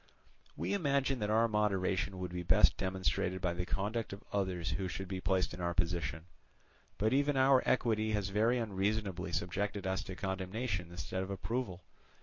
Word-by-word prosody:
"We - - -1
imagine 140 -7 +1
that 105 -1 -1
our 115 +2 +4
moderation 100 -3 +1
would 90 -1 -4
be 90 - -2
best 85 - +5
demonstrated 95 0 -1
by 90 -1 0
the 90 +1 -3
conduct 105 +2 -2
of 100 - -9
others 90 -5 0
who 95 +4 -1
should 95 +1 -5
be 95 -1 -4
placed 95 -1 +1
in 90 - -6
our 85 0 -1
position; 85 -3 -1 0.7
but 110 +4 +2
even 140 +1 +2
our 130 0 +6
equity 110 -3 +2
has 100 -2 0
very 110 +5 +3
unreasonably 100 -4 -1
subjected 100 +3 -2
us 95 0 0
to 95 - -6
condemnation 95 0 -2
instead 85 +2 -4
of 95 - -4
approval. 100 -2 -3
95 Hz, 170 wpm, -34 LUFS, 90-110 Hz, 0.7 s, our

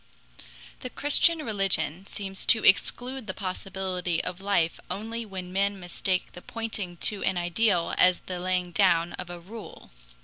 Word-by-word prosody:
The 255 - -5
Christian 300 +4 +3
religion 195 -4 0
seems 195 -1 -5
to 220 - +6
exclude 245 +5 +2
the 190 - -4
possibility 185 -2 -2
of 180 +1 -5
life 195 -5 +1
only 225 +3 -4
when 185 -2 -7
men 200 +1 +1
mistake 180 +1 -2
the 180 - -11
pointing 215 -6 -5
to 205 - -6
an 190 - +1
ideal 175 0 +1
as 180 -1 +5
the 180 -1 -5
laying 180 0 -1
down 175 -3 +3
of 180 - -7
a 175 0 -7
rule. 210 +5 -11
190 Hz, 150 wpm, -27 LUFS, 180-210 Hz, -, to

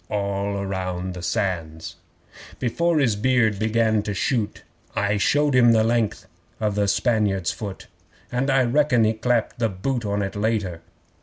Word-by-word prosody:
(All 100 -1 -2
round 95 -1 -3
the 90 - -7
Sands!) 80 -3 -3 0.6
'Before 165 +8 0
his 125 -8 +2
beard 110 -2 +2
began 110 0 +2
to 100 -1 -4
shoot, 110 +2 -1 0.3
I 105 0 +1
showed 145 +7 +2
him 120 -2 +6
the 110 -1 +4
length 115 -1 0 0.3
of 105 -2 0
the 100 0 +1
Spaniard's 100 -5 +1
foot 100 -3 -7 0.5
And 125 +3 0
I 135 -1 +4
reckon 125 -1 +3
he 110 +1 +3
clapped 120 +1 -1
the 115 -2 +1
boot 115 +6 -3
on 100 -1 -1
it 100 - -4
later. 100 -5 -1
110 Hz, 155 wpm, -23 LUFS, 100-120 Hz, 0.6 s, him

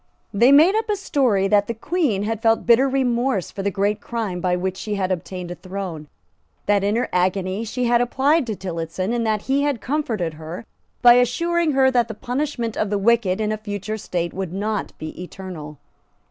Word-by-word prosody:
They 235 +6 +5
made 310 +7 +7
up 445 0 -1
a 420 - +2
story 255 - +1
that 205 0 +3
the 230 - -3
Queen 235 - 0
had 220 +1 -2
felt 225 -1 +2
bitter 240 +4 +5
remorse 250 -5 0
for 195 - -5
the 200 - 0
great 205 +2 -1
crime 215 -7 -3
by 180 0 +1
which 185 +1 -2
she 210 +2 -4
had 190 -2 -1
obtained 180 0 -4
a - - -2
throne, 185 -5 -6 0.6
that 205 -1 +2
in 205 +2 +1
her 240 - 0
agony 185 +3 0
she 250 +3 -3
had 240 0 +3
applied 270 +4 +2
to 215 - -2
Tillotson, 180 +2 -3
and 235 -2 0
that 215 -1 0
he 275 +1 +1
had 285 -4 0
comforted 230 - -2
her 160 +6 -8 0.4
by 240 -1 +9
assuring 335 +6 +1
her 265 -1 +4
that 240 -3 +2
the 220 - -7
punishment 245 -1 -3
of 215 - -1
the 205 - 0
wicked 205 -2 +2
in 215 -1 0
a 215 - -1
future 210 0 -5
state 175 -3 -3
would 190 -2 -4
not 210 +1 -3
be 155 +2 -7
eternal. 175 -5 -8
215 Hz, 200 wpm, -22 LUFS, 190-245 Hz, 0.6 s, by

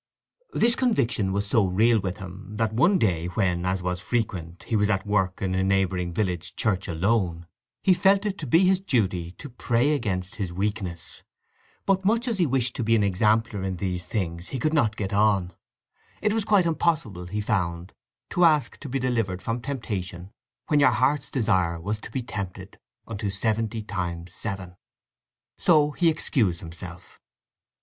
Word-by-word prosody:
This 235 +1 +4
conviction 125 - +1
was 100 +1 -1
so 105 +2 +3
real 110 +5 +3
with 95 -2 -3
him 95 +2 -9
that 110 0 0
one 170 - +4
day 85 - +1
when, 90 -2 0
as 95 -1 -1
was 90 0 -2
frequent, 90 -6 -3
he 115 - -2
was 105 0 +2
at 95 -1 0
work 95 -3 0
in 95 -1 0
a 95 0 +1
neighbouring 95 -2 +1
village 90 -2 -2
church 95 -4 0
alone, 85 -1 0 0.4
he 190 - +5
felt 195 +3 +3
it 205 -1 -2
to 150 - -5
be 165 +9 +5
his 185 0 +4
duty 95 - 0
to 145 - -10
pray 125 +2 +1
against 100 -5 -2
his 95 -5 -3
weakness. 95 -3 -4 0.6
But 195 -1 +2
much 230 +5 +2
as 225 -5 0
he 175 - +3
wished 125 -2 0
to - - -1
be 115 +1 +3
an 105 - +3
exemplar 105 +2 +2
in 95 -1 -2
these 90 -1 -3
things 85 -5 -3
he 135 - -4
could 155 +6 0
not 120 -9 +2
get 100 -2 -3
on. 100 -4 +2 0.7
It 210 -1 +1
was 220 -2 0
quite 205 -4 +4
impossible, 155 - 0
he 105 +4 -3
found, 90 -4 -2 0.4
to 180 - +2
ask 155 -4 +3
to 145 - -8
be 135 - -1
delivered 115 -8 -1
from 115 +1 -2
temptation 100 -9 -5 0.3
when 150 - +2
your 140 - +6
heart's 130 +5 +1
desire 95 -9 +1
was 105 +6 -3
to - - -9
be 130 - -3
tempted 100 -5 -7 0.3
unto 105 -2 -3
seventy 110 +2 -1
times 90 -4 -4
seven. 95 -3 -6 0.8
So 150 -3 +4
he 170 +3 +2
excused 115 - 0
himself. 85 +1 -10
105 Hz, 175 wpm, -25 LUFS, 90-130 Hz, 0.8 s, your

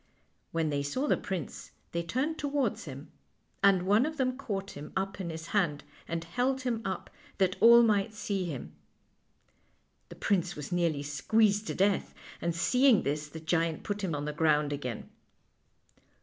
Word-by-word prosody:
When 165 -2 0
they 140 0 0
saw 255 - -1
the - - +4
prince 185 -6 -5 0.2
they 170 - -1
turned 260 - -2
towards 280 -6 -1
him, 140 -1 -9 0.5
and 195 -2 +5
one 210 +8 +4
of 315 0 -5
them 255 -1 +1
caught 200 -7 -4
him 145 +1 -9
up 195 +1 -2
in 175 - -4
his 160 -1 -6
hand 170 -9 +1 0.2
and 165 0 -3
held 250 +9 0
him 240 -3 -1
up 190 -2 -4 0.3
that 190 -1 +2
all 235 +1 +8
might 215 -1 +2
see 200 -3 -2
him. 145 -7 -6 1.4
The - - -10
prince 195 -4 0
was 150 +1 -7
nearly 170 -5 +1
squeezed 210 +8 +2
to - - -3
death, 195 +1 +1 0.3
and 170 -1 -1
seeing 250 +6 +4
this 150 +2 -2
the 160 +2 -9
giant 165 0 0
put 205 0 -3
him 170 -5 -1
on 145 0 -3
the 150 - -3
ground 150 -2 +2
again. 125 -5 -5
190 Hz, 170 wpm, -30 LUFS, 155-220 Hz, 1.4 s, all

